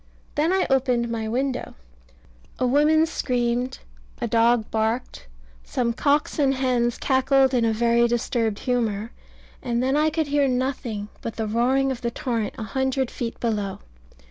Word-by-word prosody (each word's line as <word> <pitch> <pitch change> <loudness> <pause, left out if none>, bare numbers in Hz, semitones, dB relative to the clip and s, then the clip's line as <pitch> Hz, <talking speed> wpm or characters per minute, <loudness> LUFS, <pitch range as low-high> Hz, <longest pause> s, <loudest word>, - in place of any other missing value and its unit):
Then 310 +4 +1
I 380 0 +2
opened 250 -3 +1
my 225 -1 -3
window 255 +3 -2 0.8
a 255 - 0
woman 300 +5 +4
screamed, 245 -5 -1 0.4
a - - -1
dog 230 0 +2
barked, 220 - -2 0.4
some 235 - -1
cocks 290 +5 +1
and 270 -2 +3
hens 245 -2 +1
cackled 265 0 +3
in 240 -2 +2
a 225 - +2
very 235 +1 +3
disturbed 230 -2 0
humour, 225 -3 -1 0.5
and 240 0 -1
then 265 +2 +1
I 305 +1 +3
could 315 0 -1
hear 285 -1 +2
nothing 250 -5 -2
but 230 - -5
the 220 - -2
roaring 255 +5 +1
of 250 -2 -5
the 235 - -1
torrent 230 -3 -3
a - - -4
hundred 265 +2 -1
feet 230 -1 -5
below. 210 -4 -2
245 Hz, 155 wpm, -24 LUFS, 230-270 Hz, 0.8 s, woman